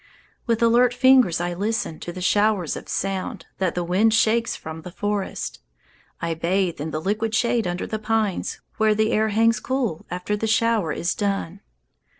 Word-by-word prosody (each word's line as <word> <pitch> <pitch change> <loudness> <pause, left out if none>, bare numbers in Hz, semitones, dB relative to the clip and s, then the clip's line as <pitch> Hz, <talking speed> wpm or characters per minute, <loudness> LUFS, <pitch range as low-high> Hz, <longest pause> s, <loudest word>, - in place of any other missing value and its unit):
With 230 0 +1
alert 240 +1 +4
fingers 250 -9 +5
I 175 0 -2
listen 205 -2 -2
To 175 - -6
the 185 +1 -8
showers 205 -3 +2
of - - -9
sound 195 -1 -3
That 185 -3 0
the 175 - -1
wind 200 +6 +3
shakes 230 +1 +2
from 160 0 -8
the 180 - -8
forest. 205 +2 -3 0.6
I 170 0 -1
bathe 170 0 -1
in 155 - -3
the 155 - -3
liquid 215 +6 -1
shade 235 -3 +1
Under 175 +1 -3
the 215 - -4
pines, 215 -3 -1 0.2
where 220 -1 +3
the 220 +1 +1
air 220 -1 +2
hangs 225 +1 +3
cool 255 - -2
After 180 +4 -2
the 220 +2 -2
shower 220 -6 +2
is 170 +1 -1
done. 195 -3 -2
205 Hz, 175 wpm, -23 LUFS, 175-225 Hz, 0.6 s, fingers